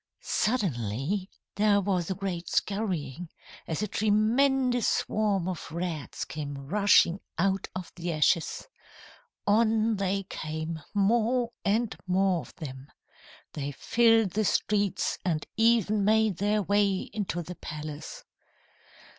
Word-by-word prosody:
"Suddenly 180 Hz, -, -1 dB, 0.3 s
there 205 Hz, -1 st, +4 dB
was 185 Hz, -3 st, -1 dB
a 190 Hz, -, -1 dB
great 180 Hz, -3 st, -4 dB
scurrying, 180 Hz, -, -2 dB, 0.4 s
as 160 Hz, +5 st, -2 dB
a -, -, -1 dB
tremendous 245 Hz, +5 st, +2 dB
swarm 205 Hz, -4 st, +1 dB
of 180 Hz, -3 st, -5 dB
rats 170 Hz, -3 st, -4 dB
came 145 Hz, -2 st, -5 dB
rushing 180 Hz, +4 st, +3 dB, 0.2 s
out 195 Hz, +2 st, +1 dB
of 185 Hz, -2 st, -6 dB
the 175 Hz, 0 st, -4 dB
ashes. 160 Hz, +2 st, +1 dB, 0.8 s
On 220 Hz, +1 st, +3 dB
they 195 Hz, 0 st, 0 dB
came, 160 Hz, -2 st, -5 dB
more 235 Hz, +4 st, +2 dB
and 220 Hz, +3 st, +1 dB
more 185 Hz, -1 st, +2 dB
of -, -, -14 dB
them. 135 Hz, -4 st, -8 dB, 0.7 s
They 145 Hz, -1 st, -4 dB
filled 225 Hz, -, +3 dB
the 215 Hz, +4 st, 0 dB
streets, 205 Hz, -1 st, 0 dB
and 160 Hz, -4 st, -1 dB
even 220 Hz, -2 st, +3 dB
made 215 Hz, -2 st, +3 dB
their 205 Hz, +2 st, +1 dB
way 200 Hz, 0 st, +2 dB
into 185 Hz, -5 st, -2 dB
the 180 Hz, -, -7 dB
palace. 155 Hz, -, -7 dB
195 Hz, 120 wpm, -28 LUFS, 170-215 Hz, 0.8 s, there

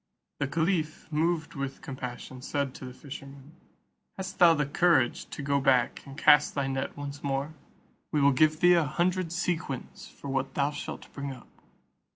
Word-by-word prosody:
The 145 Hz, -, 0 dB
caliph, 160 Hz, 0 st, -1 dB
moved 160 Hz, +1 st, 0 dB
with 135 Hz, -1 st, -5 dB
compassion, 130 Hz, -2 st, -7 dB
said 140 Hz, 0 st, -2 dB
to 130 Hz, -, -9 dB
the 125 Hz, -, -8 dB
fisherman, 140 Hz, 0 st, -10 dB, 0.7 s
"Hast 190 Hz, -1 st, -6 dB
thou 170 Hz, -2 st, +8 dB
the 150 Hz, -1 st, +1 dB
courage 145 Hz, -3 st, +2 dB
to 145 Hz, -, -6 dB
go 140 Hz, 0 st, +1 dB
back 130 Hz, -3 st, +2 dB
and 135 Hz, 0 st, -10 dB
cast 150 Hz, -1 st, +5 dB
thy 140 Hz, -1 st, 0 dB
net 135 Hz, 0 st, -3 dB
once 145 Hz, 0 st, -6 dB
more? 140 Hz, +2 st, -1 dB, 0.6 s
We 150 Hz, -, +2 dB
will 140 Hz, 0 st, +5 dB
give 155 Hz, +4 st, +3 dB
thee 175 Hz, 0 st, +7 dB
a 170 Hz, -2 st, +4 dB
hundred 175 Hz, +3 st, 0 dB
sequins 170 Hz, -6 st, -3 dB
for -, -, -11 dB
what 135 Hz, 0 st, -2 dB
thou 140 Hz, +1 st, +2 dB
shalt 145 Hz, -, -7 dB
bring 140 Hz, -1 st, -4 dB
up." 125 Hz, -3 st, -11 dB
145 Hz, 175 wpm, -29 LUFS, 135-160 Hz, 0.7 s, thou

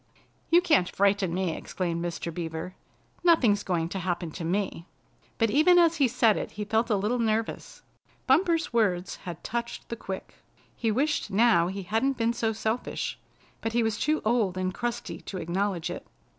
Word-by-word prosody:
"You 345 Hz, +1 st, +6 dB
can't 305 Hz, -, +3 dB
frighten 200 Hz, -2 st, +2 dB
me!" 180 Hz, -2 st, -1 dB
exclaimed 170 Hz, -2 st, -3 dB
Mr. 170 Hz, -1 st, -4 dB
Beaver. 165 Hz, +1 st, -5 dB, 0.5 s
"Nothing's 245 Hz, -, +4 dB
going 170 Hz, -4 st, -1 dB
to 190 Hz, -, -4 dB
happen 175 Hz, -2 st, -2 dB
to 170 Hz, -, -6 dB
me!" 180 Hz, 0 st, -2 dB, 0.5 s
But 225 Hz, -2 st, +2 dB
even 315 Hz, +7 st, +5 dB
as 335 Hz, -1 st, +5 dB
he 280 Hz, -3 st, +4 dB
said 230 Hz, -3 st, +3 dB
it -, -, -4 dB
he 210 Hz, +1 st, -4 dB
felt 220 Hz, +3 st, +1 dB
a 215 Hz, -, +3 dB
little 210 Hz, +5 st, 0 dB
nervous. 225 Hz, -1 st, -2 dB, 0.4 s
Bumper's 330 Hz, +1 st, +2 dB
words 195 Hz, -6 st, +1 dB
had 175 Hz, -3 st, -8 dB
touched 235 Hz, 0 st, -4 dB
the 235 Hz, -, -3 dB
quick. 190 Hz, -4 st, -7 dB, 0.4 s
He 230 Hz, -, -1 dB
wished 275 Hz, +3 st, 0 dB
now 205 Hz, -4 st, +4 dB
he 195 Hz, +1 st, -4 dB
hadn't 225 Hz, +8 st, 0 dB
been 230 Hz, 0 st, +1 dB
so 225 Hz, -1 st, 0 dB
selfish, 220 Hz, +2 st, -3 dB, 0.4 s
but 225 Hz, -, -2 dB
he 235 Hz, 0 st, +2 dB
was 220 Hz, -1 st, -1 dB
too 310 Hz, +1 st, +1 dB
old 215 Hz, -5 st, +1 dB
and 185 Hz, 0 st, -1 dB
crusty 240 Hz, +2 st, -4 dB
to 190 Hz, -, -7 dB
acknowledge 175 Hz, 0 st, -1 dB
it. -, -, -6 dB
210 Hz, 175 wpm, -27 LUFS, 180-235 Hz, 0.5 s, You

